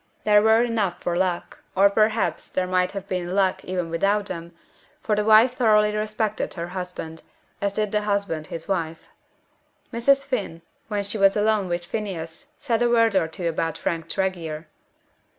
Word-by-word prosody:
There 210 -1 +5
were 220 +2 +5
enough 220 -6 -1
for 175 - -1
luck, 180 -1 -1 0.2
or 195 +1 +6
perhaps 215 +2 +1
there 185 - -1
might 180 0 +1
have 195 -1 -6
been 180 -1 -3
luck 190 -2 +1
even 180 -2 -3
without 200 +5 +1
them, 170 -3 -7 0.5
for 215 - 0
the 210 - +1
wife 220 +4 +6
thoroughly 210 -4 +3
respected 215 0 -2
her 170 -1 -5
husband, 180 -3 -6 0.4
as 200 -1 0
did 210 -1 -1
the 210 - +1
husband 200 -7 -2
his 165 - -7
wife. 165 -4 -3 0.8
Mrs. 275 +4 +3
Finn, 195 -11 -3 0.2
when 205 -3 -2
she 205 +2 -3
was 195 +1 +5
alone 210 -2 +2
with 175 0 -3
Phineas, 185 - -5
said 240 -5 -1
a 240 - +3
word 230 -3 +3
or 165 - +3
two 170 +2 -4
about 165 -1 -1
Frank 165 -1 -3
Tregear. 170 -5 -2
195 Hz, 170 wpm, -24 LUFS, 175-215 Hz, 0.8 s, or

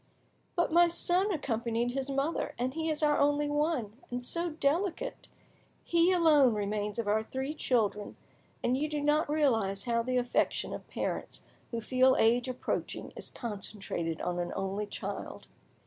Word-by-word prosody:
"But 345 -2 +1
my 345 +1 +6
son 360 +4 +2
accompanied 235 - -1
his 270 +1 -3
mother, 280 +2 -1
and 255 +2 -1
he 320 +1 -2
is 310 0 -1
our 295 -1 +3
only 290 +1 +3
one, 290 -6 -1
and 245 0 -4
so 340 +5 -1
delicate! 335 - -1 0.6
He 340 +1 +3
alone 300 -9 +5
remains 210 +1 -2
of 230 -3 -2
our 215 +1 +3
three 265 +6 -4
children, 215 -8 0 0.5
and 245 - +2
you 300 +3 -1
do 300 -1 -2
not 295 +1 +2
realise 225 -10 +1
how 235 -1 +1
the 255 +2 -1
affection 245 0 0
of - - -7
parents - - -4 0.3
who 230 -1 -3
feel 255 +3 +4
age 240 +3 +3
approaching 255 - -3
is - - -8
concentrated 195 -7 -4
on 175 0 -2
an 175 0 -2
only 195 +2 -2
child! - - -6
260 Hz, 160 wpm, -31 LUFS, 220-305 Hz, 0.6 s, my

